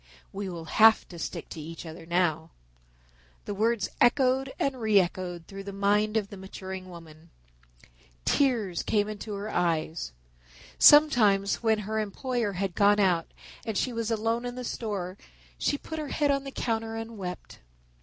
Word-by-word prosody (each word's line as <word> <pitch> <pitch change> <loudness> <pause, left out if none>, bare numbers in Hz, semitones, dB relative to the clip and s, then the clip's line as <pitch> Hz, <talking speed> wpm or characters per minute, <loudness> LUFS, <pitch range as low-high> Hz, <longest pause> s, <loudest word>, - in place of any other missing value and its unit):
"We 200 0 -4
will 170 -2 -7
have 220 +6 +5
to 170 - -9
stick - - -5
to 160 - -7
each 165 +3 -8
other 165 0 -9
now." 165 -2 +1 1.0
The 205 - -3
words 220 +1 +1
echoed 260 +2 +3
and 265 -3 -1
re 215 -2 +5
echoed 175 -2 -3
through 195 0 -8
the 200 - -5
mind 210 +2 +2
of 205 -2 -1
the 200 - -9
maturing 190 -1 -8
woman. 165 -1 -13 1.0
Tears 230 - +1
came 205 -1 +1
into 215 0 -6
her 205 +2 -5
eyes. 165 - -1 0.7
Sometimes 220 -10 +6
when 220 -2 +3
her 215 +1 -2
employer 220 +1 -2
had 190 0 -2
gone 205 +2 +4
out 180 -4 +2 0.3
and 220 -4 -3
she 250 - 0
was 230 -1 -2
alone 225 +1 0
in 245 0 -5
the 250 - -5
store 200 -6 -4 0.4
she 285 - +1
put 320 +2 -7
her 305 - -4
head 290 0 +1
on 275 0 -1
the 275 - -5
counter 225 -3 -2
and 225 0 -6
wept. 180 -2 -7
205 Hz, 165 wpm, -28 LUFS, 180-230 Hz, 1.0 s, Sometimes